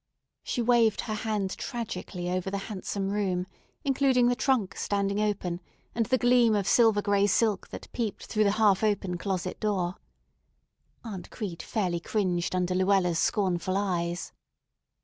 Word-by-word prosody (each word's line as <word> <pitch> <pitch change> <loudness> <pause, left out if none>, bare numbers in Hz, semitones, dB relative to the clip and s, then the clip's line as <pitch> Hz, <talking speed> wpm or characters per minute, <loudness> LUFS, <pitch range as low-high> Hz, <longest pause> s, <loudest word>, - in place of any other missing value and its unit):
She 240 - -2
waved 230 -3 +3
her 220 - -4
hand 210 -3 -2
tragically 200 -7 -5
over 185 +1 -1
the 200 - -2 0.2
handsome 195 0 -3
room, 190 -3 0 0.4
including 265 -3 +3
the 245 - +2
trunk 245 -7 +1
standing 200 0 -1
open, 185 -4 -1 0.3
and 230 -1 0
the 255 +1 +3
gleam 245 -3 +4
of 200 -2 0
silver 220 -4 +4
gray 200 -1 +3
silk 210 0 +1
that - - -8
peeped 225 -4 -3
through 215 -1 +1
the 200 - +3
half 210 -2 +4
open 195 -4 0
closet 185 -1 -3
door. 190 -4 -1 1.1
Aunt 205 -6 -7
Crete 190 -7 -5
fairly 180 -6 -1
cringed 180 -2 -1
under 180 0 0
Luella's 185 -2 +2
scornful 185 0 +1
eyes. 175 -3 -2
200 Hz, 150 wpm, -28 LUFS, 185-220 Hz, 1.1 s, gleam